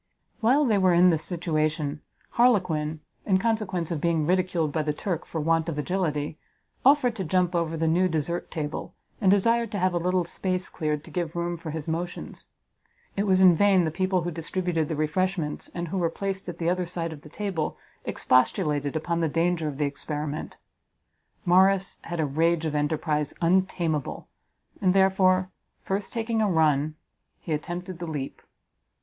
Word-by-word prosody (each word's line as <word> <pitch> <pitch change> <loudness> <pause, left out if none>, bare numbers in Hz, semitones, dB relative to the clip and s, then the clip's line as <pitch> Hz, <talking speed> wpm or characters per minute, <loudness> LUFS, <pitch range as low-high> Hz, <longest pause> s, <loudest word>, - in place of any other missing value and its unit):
While 260 +6 +4
they 215 -5 +3
were 185 -2 +4
in 180 +1 +6
this 160 -1 0
situation, 155 -4 -1 0.3
Harlequin, 165 -10 +2 0.2
in 190 -2 +3
consequence 190 -5 -1
of 160 -4 -2
being 165 -3 +1
ridiculed 180 -3 +1
by 155 - 0
the 150 -1 -2
Turk 175 0 -3
for 160 - -4
want 165 +1 +1
of 155 - -4
agility, 150 -2 -2 0.4
offered 260 -3 +4
to 190 - -2
jump 180 +1 +1
over 165 -1 0
the 165 - 0
new 175 +3 +3
desert 165 +2 -2
table, 150 -1 -5 0.3
and 195 - +4
desired 230 +3 +3
to - - -1
have 185 -1 +1
a 175 - +1
little 180 +1 +1
space 185 +2 -2
cleared 150 -3 -2
to - - -13
give 170 -3 -3
room 175 0 -1
for 165 -1 -7
his 155 0 -5
motions. 170 +2 -5 0.7
It 200 +1 0
was 190 -1 +4
in 185 -2 +8
vain 190 0 +4
the 160 - -1
people 185 +1 0
who 175 - -2
distributed 165 -1 -2
the 160 - -1
refreshments, 160 +1 -1
and 170 -1 -3
who 190 - -2
were 170 -2 +1
placed 195 +1 -4
at 175 - -6
the 165 - -2
other 180 0 0
side 165 -2 -3
of 145 - -11
the 150 - -13
table, 185 -3 -3 0.3
expostulated 145 +2 +1
upon 170 +2 -1
the 165 -2 +1
danger 165 0 +1
of 145 -2 -4
the 150 - +1
experiment; 150 +1 -4 0.9
Morrice 190 +2 +4
had 170 0 -4
a 155 - +2
rage 165 +3 +1
of 155 - -1
enterprise 150 0 -1
untameable, 170 -4 0 0.5
and, 185 -1 +3
therefore, 190 -1 +3 0.3
first 195 +1 -2
taking 225 -1 -1
a 210 - +2
run, 155 -3 +2 0.4
he 160 - -4
attempted 175 +4 -4
the 170 - -5
leap. 145 -4 -5
170 Hz, 180 wpm, -26 LUFS, 155-185 Hz, 0.9 s, in